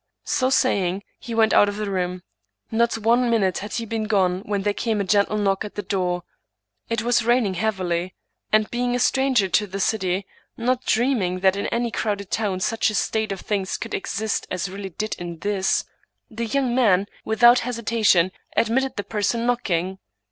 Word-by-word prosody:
So 255 - +1
saying, 200 -8 +1 0.2
he 235 - -6
went 225 -1 +3
out 205 - +6
of 205 - -5
the 210 -2 -3
room. 180 -1 -2 0.5
Not 230 +1 +2
one 235 +3 +2
minute 195 -6 +1
had 205 +1 -7
he 230 - -2
been 225 0 -2
gone 190 -4 +2
when 200 -1 -1
there 205 0 +1
came 220 0 -1
a - - +1
gentle 200 +2 +2
knock 195 -1 +1
at 210 - -8
the 205 - -3
door. 180 -2 -1 0.7
It 230 -1 -1
was 240 0 +2
raining 235 -4 +2
heavily, 185 -3 -1 0.4
and, 215 0 +4
being 245 0 0
a - - 0
stranger 260 -4 +2
to 210 +3 +2
the 195 +1 -5
city, 190 -2 0 0.3
not 250 +2 0
dreaming 215 -7 +1
that 190 0 +4
in 200 - -2
any 235 0 -1
crowded 200 -3 -2
town 200 -4 -1
such 225 +4 +1
a 215 - -4
state 220 0 0
of 195 - -4
things 195 -3 -2
could - - -7
exist 215 +2 -2
as 185 0 -3
really 195 0 -6
did 215 +5 -3
in 175 -1 -6
this, 200 +1 0 0.5
the 230 +1 -3
young 260 +1 0
man, 205 -7 +3 0.2
without 240 +2 +5
hesitation, 225 -7 +2 0.3
admitted 260 +4 +1
the 205 - -3
person 220 +3 -1
knock 245 -2 0
ing. 185 +2 -1
210 Hz, 190 wpm, -23 LUFS, 190-235 Hz, 0.7 s, out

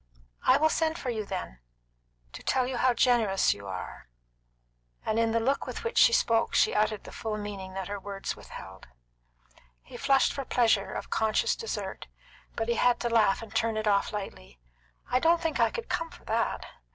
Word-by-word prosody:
"I - - +7
will 315 - +3
send 320 0 0
for 255 - -3
you, 215 -3 -4
then 180 - -5 0.7
to - - -8
tell 260 -1 +1
you 255 0 -3
how 255 +1 +3
generous 225 -6 +3
you 100 0 -11
are," 95 -7 -7 1.0
and 220 +1 +1
in 230 0 +2
the 230 - +2
look 270 +5 0
with - - -6
which 465 0 0
she - - +7
spoke 230 - +2
she - - +4
uttered 215 0 +1
the - - -10
full 220 -1 -4
meaning 195 -2 -6
that 190 -1 -4
her 205 0 -4
words 195 0 -5
withheld. 95 +1 -11 1.0
He - - -11
flushed 275 -1 +3
for 275 - -4
pleasure 225 -6 +2
of - - -6
conscious 220 - +1
desert, 455 - -5 0.5
but 225 - -2
he 235 -1 0
had 245 -1 +3
to 240 - 0
laugh 225 -3 +3
and 220 -1 -11
turn 225 -1 +1
it 215 0 -2
off 200 -1 +2
lightly. 130 - -7 0.5
"I 250 - +4
don't 335 +4 +4
think 325 -2 -2
I - - +4
could 465 -1 -6
come 330 0 -2
for - - -16
that. 230 +1 -1
225 Hz, 195 wpm, -28 LUFS, 200-255 Hz, 1.0 s, I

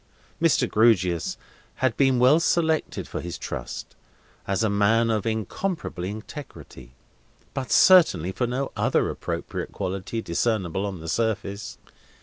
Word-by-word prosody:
Mr. - - +3
Grewgious 95 -7 +2 0.4
had 130 -3 0
been 135 -2 +3
well 130 +6 +5
selected 160 -2 0
for - - -5
his 85 0 -6
trust, - - -6 0.5
as 100 +3 0
a - - +3
man 110 +3 +3
of 110 -1 -1
incorruptible 110 - -3
integrity, 100 - -9 0.6
but 130 -2 -4
certainly 165 - +6
for 120 +5 -1
no 130 +3 -2
other - - +1
appropriate - - -5
quality 95 +4 -4
discernible 95 -1 -1
on 95 -4 -6
the 80 - -8
surface. 105 +1 -2
110 Hz, 130 wpm, -25 LUFS, 95-130 Hz, 0.6 s, certainly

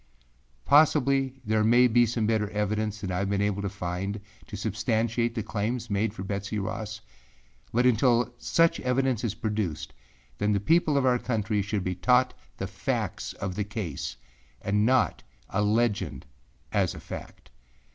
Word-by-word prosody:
Possibly 135 -2 +4
there 110 0 +2
may 120 +3 +6
be 120 0 +4
some 115 -1 -1
better 110 -2 +1
evidence 105 +1 -1
than 95 - -3
I 90 - -1
have 100 -1 -1
been 100 0 0
able 100 0 0
to 100 - -2
find 95 +1 -4 0.3
to - - -7
substantiate 115 +2 0
the 110 - -2
claims 110 +3 -3
made 100 +2 +1
for 95 - -7
Betsey 100 +2 -3
Ross; 105 +2 -4 0.7
but 120 +2 +2
until 120 0 +3
such 165 0 +2
evidence 125 -2 0
is 110 -3 -1
produced, 105 - -3 0.5
then 105 +1 +2
the 100 - +2
people 155 - +3
of 135 - +2
our 125 -1 +3
country 105 -4 -1
should 100 0 -2
be 95 - -1
taught 125 +6 +3 0.2
the - - -3
facts - - -3
of 95 -2 -4
the 105 - -1
case 100 - -4 0.4
and 105 +2 +1
not 130 0 +2 0.3
a 100 - +1
legend 105 - 0 0.5
as - - +1
a - - -8
fact. - - -9
110 Hz, 165 wpm, -27 LUFS, 100-120 Hz, 0.7 s, may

